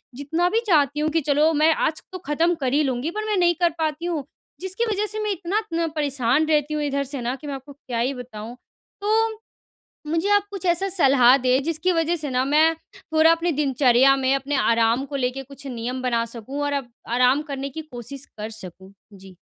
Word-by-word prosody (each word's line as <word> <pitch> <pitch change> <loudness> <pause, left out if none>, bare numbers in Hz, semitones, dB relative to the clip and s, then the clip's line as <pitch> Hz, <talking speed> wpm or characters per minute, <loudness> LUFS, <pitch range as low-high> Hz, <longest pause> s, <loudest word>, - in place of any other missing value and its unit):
जितना 320 +6 0
भी 450 - +2
चाहती 295 -4 +3
हूँ 310 - +1
कि 325 +1 +1
चलो 295 +3 +3
मैं 310 +2 +4
आज 310 - -1
तो 370 - -5
ख़त्म 335 +4 +2
कर 260 0 0
ही 300 +1 +3
लूँगी 260 +3 -2
पर 430 +3 -4
मैं 420 -2 0
नहीं 345 -1 +3
कर 345 - +5
पाती 315 +1 -2
हूँ 325 -5 -2 0.4
जिसकी 380 +5 -2
वज़ह 415 +1 0
से 430 - -4
मैं 420 - 0
इतना 380 +3 -1
इतना 335 -6 -2
परेशान 280 -1 +1
रहती 305 -1 +1
हूँ 300 - -1
इधर 280 -1 -1
से 255 - -4
ना 245 +2 -2
कि 295 - -10
मैं 280 - -3
आपको 270 +2 -11
क्या 250 -4 -5
ही 255 +4 0
बताऊँ। 240 -2 -8 0.5
तो 440 +1 +1 0.7
मुझे 330 +5 0
आप 410 0 0
कुछ 390 -3 -6
ऐसा 350 +3 +2
सलाह 270 -8 +5
दें 255 +1 +2
जिसकी 330 +3 0
वज़ह 330 +1 +1
से 300 -3 -4
न 255 +1 +1
मैं 315 +2 +4 0.2
थोड़ा 320 +1 +3
अपनी 330 0 0
दिनचर्या 270 -2 +4
में, 265 0 +1
अपने 275 +1 -1
आराम 230 +1 +2
को 280 - -5
लेके 260 +1 -2
कुछ 275 +1 -13
नियम 250 +1 -4
बना 235 -2 +1
सकूँ 265 +6 -5
और 285 - -1
अब 270 -4 -3 0.2
आराम 250 +4 +3
करने 275 0 -3
की 315 +4 -6
कोशिश 275 0 -8
कर 215 +1 -5
सकूँ। 190 +1 -12 0.2
जी। 190 -1 -14
285 Hz, 215 wpm, -23 LUFS, 255-330 Hz, 0.7 s, कर